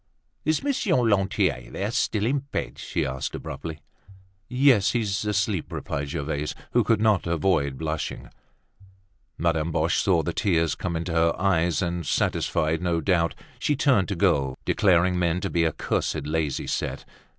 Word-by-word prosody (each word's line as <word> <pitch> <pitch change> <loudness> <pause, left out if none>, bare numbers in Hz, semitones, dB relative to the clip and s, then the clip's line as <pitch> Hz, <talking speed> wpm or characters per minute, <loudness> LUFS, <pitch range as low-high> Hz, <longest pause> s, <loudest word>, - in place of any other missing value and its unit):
"Is 155 - +1
Monsieur 275 -9 +1
Lantier, 100 - +1
then, 100 - -3
still 105 -3 0
in 140 +4 +1
bed?" 140 0 -5
she - - -2
asked 65 0 -3
abruptly. 80 -4 -7 0.7
"Yes, 125 -5 +4
he's 105 -5 0
asleep," 100 -3 -1
replied 70 0 -4
Gervaise, 75 0 -3 0.2
who 120 - +3
could 110 0 +2
not 105 -5 +2
avoid 80 -5 +1
blushing. 75 0 -4 1.1
Madame 80 -1 0
Boche - - +1
saw - - +2
the - - -2
tears 85 -5 +1
come 90 -2 -3
into 85 +1 -3
her 85 0 +2
eyes; 90 -4 +2
and, 85 0 -2
satisfied 80 +2 0
no 85 -2 +1
doubt, 85 -3 +1 0.2
she 150 - +1
turned 130 -8 +3
to 100 - -2
go, 70 -8 +1
declaring 90 -1 +3
men 85 0 +1
to - - -3
be 85 -1 +2
a 80 - +2
cursed, - - -2
lazy 75 -2 -1
set. - - -3
85 Hz, 155 wpm, -25 LUFS, 80-105 Hz, 1.1 s, Yes